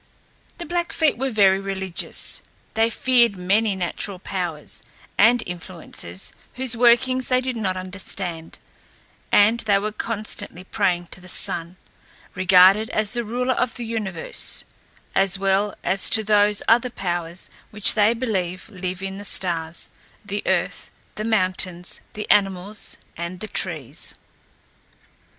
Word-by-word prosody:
The 345 - -6
Blackfeet 340 -2 +1
were 265 +3 -1
very 195 -4 +4
religious. 190 -2 -2 0.3
They 225 +1 +3
feared 235 -4 +3
many 200 +3 +2
natural 190 +2 -3
powers 175 -5 -4 0.3
and 235 +2 +5
influences 170 - -5 0.2
whose 255 -2 +1
workings 250 +2 +4
they 255 -1 +3
did 255 -1 -3
not 190 -5 -1
understand, 185 -3 -5 0.7
and 215 +3 +5
they 205 -3 +2
were 210 +2 -2
constantly 215 -4 -4
praying 175 -2 0
to 185 - -5
the 180 - -13
Sun 170 +1 -1 0.6
regarded 185 +3 +6
as 215 0 0
the 240 -1 -1
ruler 250 +3 0
of 250 -1 -1
the 240 - -4
universe 210 -7 -2 0.5
as 195 0 +2
well 195 +1 +1
as 190 +1 +1
to 220 - +5
those 210 -1 +3
other 235 +2 +4
powers 175 -5 -3 0.2
which 210 -1 +6
they 215 +2 +4
believe 190 -6 -2
live 185 -2 -5
in 195 0 -4
the - - -7
stars, 170 -4 -1 0.3
the 205 0 -3
earth, - - 0 0.2
the 215 - -5
mountains, 185 -4 0
the 210 - -5
animals, 195 0 +1 0.2
and 170 +2 -5
the 215 - -5
trees. 155 - -2
195 Hz, 130 wpm, -23 LUFS, 180-225 Hz, 0.7 s, regarded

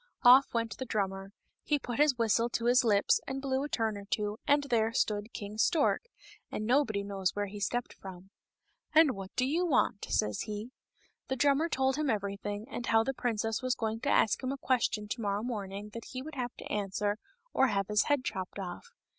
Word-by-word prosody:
Of! 255 +3 +8
went 230 -3 -1
the 260 - -3
drummer; 195 -3 -2 0.3
he 295 - +1
put 245 -2 -5
his 295 -4 +4
whistle 230 +1 +2
to 235 0 -2
his 250 +2 +5
lips 205 -3 +3
and 270 0 -3
blew 265 -1 -1
a 295 - -4
turn 225 -5 0
or 200 - -10
two, 210 +1 -2
and 285 0 +4
there 230 -5 +1
stood 210 +1 0
King 210 -1 -7
Stork, 315 - +2 0.5
and 215 - -3
nobody 235 -5 +2
knows 195 -2 -2
where 205 0 0
he 205 +1 -8
stepped 240 +5 -2
from. 190 0 -11 0.3
" - - -33
And 315 -3 +7
what 195 -4 -7
do 255 - +2
you 320 +7 +1
want 250 - +1
?" - - -15
says 105 -1 0
he. 210 +3 -5 0.6
The 265 - -1
drummer 285 +5 +3
told 265 -2 +1
him 305 -2 0
everything, 205 0 -2
and 240 -3 -5
how 225 0 +4
the 270 - -2
princess 225 -2 -1
was 255 -1 0
going 225 0 -2
to 280 - -2
ask 220 - +3
him 260 0 -2
a 275 - -3
question 235 -5 0
to 230 +3 -4
morrow 205 0 -1
morning 205 -3 -5
that 230 +2 -8
he 255 0 -4
would 310 +2 -8
have 250 -3 -4
to - - -10
answer, 205 0 -1 0.4
or 270 - +4
have 200 -4 0
his 210 0 +2
head 290 -3 +1
chopped 185 0 -4
off. 190 - -6
225 Hz, 215 wpm, -31 LUFS, 205-260 Hz, 0.6 s, Of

